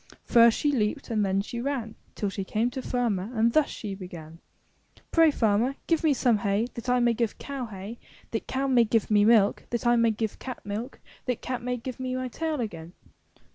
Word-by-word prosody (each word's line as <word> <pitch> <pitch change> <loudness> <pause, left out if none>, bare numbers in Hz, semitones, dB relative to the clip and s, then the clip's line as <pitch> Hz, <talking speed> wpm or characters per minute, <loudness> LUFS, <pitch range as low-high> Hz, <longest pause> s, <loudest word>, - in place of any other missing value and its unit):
First 235 -1 +6
she 295 - +1
leaped 215 -4 -1
and 215 -2 +1
then 195 0 +1
she 235 +3 -5
ran 260 -4 -2
^5^(^ 220 - -15 0.2
Till 205 - -1
she 195 0 -4
came 225 +5 0
to 260 - -4
the - - -10
farmer 225 -6 0
and 230 +1 +3
thus 310 -2 +3
she 205 -3 -6
began: 170 -4 -9 0.7
"Pray, 330 -1 +6
Farmer, 235 0 +1
give 330 -1 +1
me 315 - +4
some 245 -5 +2
hay 200 +2 +1
that 235 +1 -6
I 250 0 +3
may 240 -1 +3
give 230 -2 -1
cow 275 -3 -5
hay, 205 +3 -8 0.3
that 225 - -3
cow 265 +1 -1
may 255 -3 +4
give 225 -1 0
me 205 -1 +5
milk, 215 -3 +4
that 235 0 -2
I 240 0 +4
may 230 0 +4
give 220 -1 -3
cat 255 -5 -7
milk, 215 +6 -5 0.3
that 250 -2 -2
cat 255 -1 -3
may 250 +1 -2
give 250 +1 -7
me 255 0 -2
my 255 0 -3
tail 315 +2 -2
again." 170 -7 -5
230 Hz, 220 wpm, -27 LUFS, 210-255 Hz, 0.7 s, First